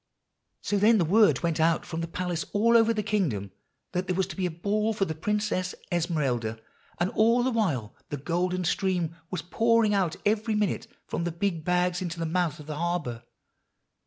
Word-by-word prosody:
"So 205 - 0
then 220 +3 +5
the 175 - +2
word 210 +5 +4
went 165 -1 0
out 165 +1 +2
from 165 -1 -4
the 165 - -3
palace 175 0 -2
all 230 +3 +4
over 230 0 +6
the 215 -2 -1
kingdom, 160 - -1 0.4
that 180 +1 -2
there 185 - 0
was 190 0 +1
to - - -6
be 185 -2 0
a - - -3
Ball 210 +6 0
for 200 -2 0
the 160 - -3
Princess 195 +1 -1 0.2
Esmeralda; 140 -10 -1 0.4
and 175 +2 +1
all 230 +3 +3
the 260 - +1
while 155 - 0 0.2
the 145 - -3
golden 180 +5 -1
stream 175 -2 0
was 185 -3 -4
pouring 225 +3 +3
out 185 -5 +1
every 215 +1 +1
minute 210 +2 0 0.2
from 170 - -3
the 175 - -1
big 170 -1 -2
bags 180 +1 +1
into 175 -2 -4
the 165 - -2
mouth 165 -2 0
of 150 - -10
the 150 -1 -5
harbor. 165 -9 -2
180 Hz, 195 wpm, -27 LUFS, 165-210 Hz, 0.4 s, over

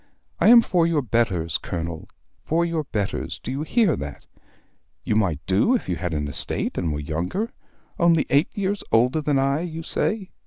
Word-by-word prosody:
I - - +4
am 235 +1 +9
for 170 -2 +2
your 155 -4 +1
betters, 105 -9 0
Colonel, 85 -1 -5 0.3
for 170 +2 +1
your 165 -3 -2
betters: 105 -6 -3
do 125 - -4
you 135 +2 -3
hear 180 - +2
that? - - -7 0.8
You 105 - 0
might 90 -9 0
do 100 - +3
if 240 - -3
you 90 - -1
had 90 +1 -3
an 75 -1 -2
estate 70 - -1
and 85 - -1
were 75 - -3
younger; 85 - -3 0.5
only 170 -2 +4
eight 145 +5 +3
years 200 0 -1
older 125 +7 +3
than 145 -2 +1
I, 135 +2 +1
you 165 -1 -5
say! 200 +4 -1
140 Hz, 185 wpm, -23 LUFS, -, 0.8 s, am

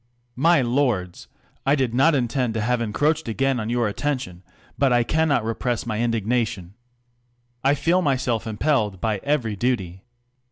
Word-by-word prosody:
My 160 +1 +4
lords, 120 -8 -1 0.4
I 140 - +3
did 130 -5 -1
not 140 +6 +4
intend 125 -2 -1
to 110 - -1
have 120 +2 0
encroached 145 +6 0
ain 135 +3 0
on 110 0 -3
your 120 -1 +1
attention; 105 -6 -3 0.3
but 140 -2 +2
I 120 -1 +4
cannot 155 -2 +1
repress 120 +1 -2
my 110 -2 -3
in 120 +1 +1
durnation. 110 -5 -1 0.9
I 140 +2 +3
feel 170 +5 +2
myself 125 - 0
impelled 110 - 0
by 105 +1 -1
every 130 -7 0
duty. 95 -6 -2
120 Hz, 155 wpm, -23 LUFS, 110-140 Hz, 0.9 s, My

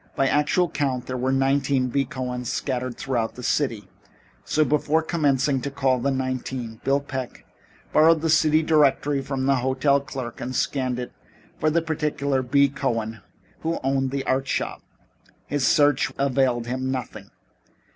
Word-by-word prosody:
By 135 - +2
actual 150 +6 +2
count 135 -5 -2
there 130 - -4
were 130 +1 0
nineteen 135 -1 +1
B. 135 +2 +1
Cohens 125 -2 -4
scattered 130 -2 -3
throughout 120 -4 -2
the 125 - -9
city, 115 -8 0 0.6
so 155 0 +1
before 150 +3 +1
commencing 145 -4 +1
to 140 - -3
call 135 -2 +1
the 135 +3 0
nineteen, 130 -3 -3
Bill 140 +1 +2
Peck 130 -3 -6 0.5
borrowed 160 +1 +5
the 165 - 0
city 155 0 +4
directory 145 -2 +3
from 135 -1 -3
the 135 0 +3
hotel 130 +3 +2
clerk 130 -4 -7
and 130 +1 -4
scanned 130 -2 0
it 125 0 -5 0.5
for 155 - +2
the 165 +1 +1
particular 150 -4 -1
B. 140 +3 +3
Cohen 115 -5 -3 0.4
who 165 +1 -2
owned 135 0 +1
the 135 0 -3
art 130 +1 0
shop. - - -2 0.6
His 145 -3 0
search 145 0 +3
availed 130 -3 +1
him 130 +2 -3
nothing. 130 -2 -5
135 Hz, 155 wpm, -24 LUFS, 130-145 Hz, 0.6 s, borrowed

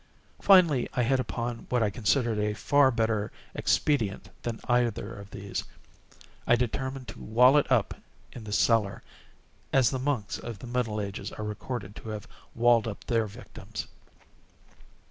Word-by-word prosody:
Finally 170 -10 +5
I 125 - +2
hit 130 +2 +2
upon 120 -1 -4
what 125 -2 +2
I 105 - +1
considered 115 +1 +1
a 105 0 0
far 145 +5 +4
better 110 -3 0 0.2
expedient 115 -10 0
than 115 -1 -4
either 120 -3 +1
of 100 0 -10
these. 100 0 -5 0.8
I 120 - +6
determined 130 +2 -2
to - - -9
wall 125 +5 +5
it 145 -2 +3
up 120 -5 +3 0.4
in 120 - -9
the 105 - -7
cellar—as 115 +4 0
the 130 - -2
monks 130 -6 -2
of 115 -3 -6
the 95 - -10
middle 120 -3 -1
ages 100 0 -5
are 105 - -6
recorded 105 -1 -5
to 110 - -8
have 105 -1 -6 0.3
walled 120 -1 +4
up 105 - -6
their 115 -2 +1
victims. 110 -1 -8
115 Hz, 150 wpm, -28 LUFS, 105-125 Hz, 0.8 s, I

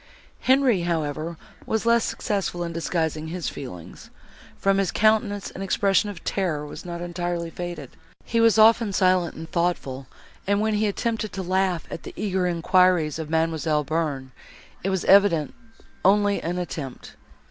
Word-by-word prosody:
Henri, 260 -7 +3
however, 165 -1 -2 0.3
was 220 0 -1
less 235 0 +4
successful 195 -4 -2
in 170 -1 -4
disguising 160 -2 -2
his 175 +1 -3
feelings. 90 - -9 0.5
From 195 0 +2
his 195 - +1
countenance 215 -2 +1
an 190 - -8
expression 195 +1 +2
of 195 -5 -9
terror 165 -7 -1
was 150 - -9
not 170 -1 -6
entirely 175 -1 -3
faded; 175 -7 -6 0.3
he 230 0 +1
was 230 -2 +5
often 220 -1 +5
silent 185 -3 +2
and 160 0 -9
thoughtful, 140 -7 -1 0.4
and 200 0 +2
when 215 +1 +1
he 210 +1 +1
attempted 220 0 -2
to 190 - -4
laugh 185 -1 0
at - - -5
the - - -10
eager 190 -3 0
enquiries 175 -2 +2
of 155 -2 -5
Mademoiselle 160 -1 +1
Bearn, 145 -4 -2 0.5
it 195 - 0
was 190 -2 -1
evidently 190 -7 +4 0.5
only 205 +1 +3
an 175 +2 -3
attempt. 150 -7 -6
180 Hz, 155 wpm, -24 LUFS, 160-200 Hz, 0.5 s, was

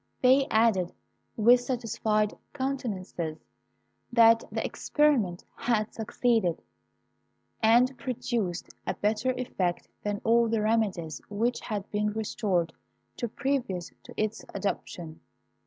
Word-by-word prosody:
They 265 +2 +5
added, 220 -6 +3 0.4
with 240 +3 +6
satisfied 220 -4 0 0.2
countenances, 210 - -3 0.7
that 230 -1 +6
the - - -2
experiment 250 - +1
had 220 -3 0
succeeded, 220 -5 0 1.0
and 240 +4 +5
produced 230 -8 -2 0.2
a - - 0
better 215 +4 0
effect 185 -8 -2
than 205 -1 -2
all 235 +1 +4
the 220 -1 +1
remedies 195 - 0
which 230 +4 0
had 210 -3 -4
been 210 0 0
resorted 200 -6 -1 0.4
to 240 - -2
previous 245 -8 -2
to - - -12
its 215 +1 -1
adoption. 170 -5 -4
220 Hz, 105 wpm, -28 LUFS, 195-240 Hz, 1.0 s, with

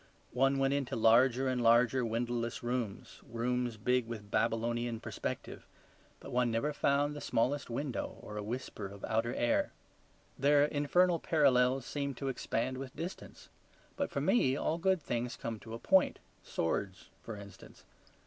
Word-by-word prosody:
One 135 +2 +3
went 135 0 +2
into 140 -3 -1
larger 120 +3 +4
and 130 -1 0
larger 120 +2 +4
windowless 120 +1 -2
rooms, 120 -4 -4
rooms 120 0 -2
big 125 +2 +1
with 110 -3 -7
Babylonian 115 0 0
perspective; - - -5 0.5
but - - -10
one 125 -1 +2
never 115 +7 0
found 145 +1 +1
the 145 - -6
smallest 135 +5 0
window 130 +2 -3
or 105 - -9
a 105 - -3
whisper 110 -2 -5
of 100 0 -8
outer 115 +1 0
air. 120 - +1 0.7
Their 145 +1 +5
infernal 165 +4 +2
parallels 130 -5 +3
seemed 140 -2 -3
to 135 - -2
expand 130 0 -2
with 135 -1 -7
distance; 175 +3 -7 0.5
but - - -1
for - - -2
me 135 - +3
all 160 +3 -1
good 185 -2 +2
things 120 +2 -2
come 115 -2 -5
to 110 +3 -8
a - - -5
point, 190 +9 +3 0.2
swords 95 +3 -3
for 115 - -7
instance. 100 -2 -13
125 Hz, 155 wpm, -33 LUFS, 115-140 Hz, 0.7 s, Their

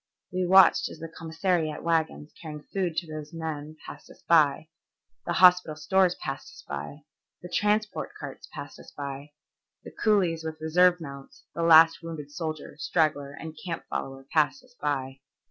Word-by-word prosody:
We 185 0 0
watched 190 +1 +6
as - - -10
the 165 - -7
commissariat 160 -1 -2
wagons 160 -2 -1
carrying 150 -2 -8
food 180 -4 -1
to 175 - 0
these 155 0 -8
men 155 -1 -5
passed - - -11
us - - -17
by, 155 -1 +4 0.6
the 175 - 0
hospital 180 -3 +5
stores 180 +4 +2
passed 135 -2 -6
us - - -14
by, 75 - -6 0.4
the 180 - -8
transport 210 +3 0
carts - - -9
passed - - -9
us - - -13
by, 140 +1 -7 0.5
the - - -10
coolies 185 -7 +1
with 160 0 -5
reserve 180 +3 +4
mounts, 140 -3 -10
the 170 - -4
last 165 0 +7
wounded 160 -4 -7
soldier, 155 0 -5
straggler, 150 -4 0
and 160 +1 -8
camp 170 -2 -4
follower 135 0 -4
passed 160 - +2
us 255 -1 -22
by. 135 -2 -2
160 Hz, 165 wpm, -27 LUFS, 150-175 Hz, 0.6 s, last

